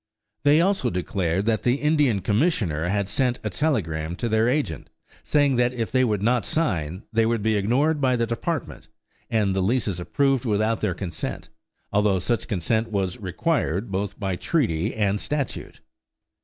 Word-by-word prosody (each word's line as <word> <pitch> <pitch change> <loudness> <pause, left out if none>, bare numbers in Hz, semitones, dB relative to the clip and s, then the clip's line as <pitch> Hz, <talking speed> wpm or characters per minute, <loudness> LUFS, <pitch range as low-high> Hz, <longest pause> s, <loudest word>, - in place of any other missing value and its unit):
They 145 +4 +5
also 195 +2 +1
declared 90 0 -1
that 110 -1 +1
the 125 +1 +2
Indian 145 -8 +2
Commissioner 100 - +1
had 100 +1 0
sent 125 +3 0
a - - -2
telegram 85 - -1
to 120 - -3
their 110 +1 +2
agent 130 - -2 0.3
saying 145 -3 +2
that 125 0 +2
if 115 -3 -3
they 130 +1 +3
would 105 -5 0
not 120 0 +2
sign 95 - -1
they 115 0 +3
would 115 -2 0
be 110 0 +2
ignored 135 +10 +1
by 130 -2 +3
the 115 -1 +1
Department, 115 0 -4 0.4
and 105 -4 +1
the 95 - +1
leases 100 -2 0
approved 135 +7 +1
without 110 -1 0
their 90 - 0
consent, 85 -5 -5 0.4
although 105 -2 +3
such 110 +5 -1
consent 110 +3 0
was 95 -3 -1
required 100 - -1
both 100 +1 -3
by 95 -3 -1
treaty 105 - 0
and 105 -2 +1
statute. 145 -2 -4
110 Hz, 165 wpm, -24 LUFS, 95-130 Hz, 0.4 s, They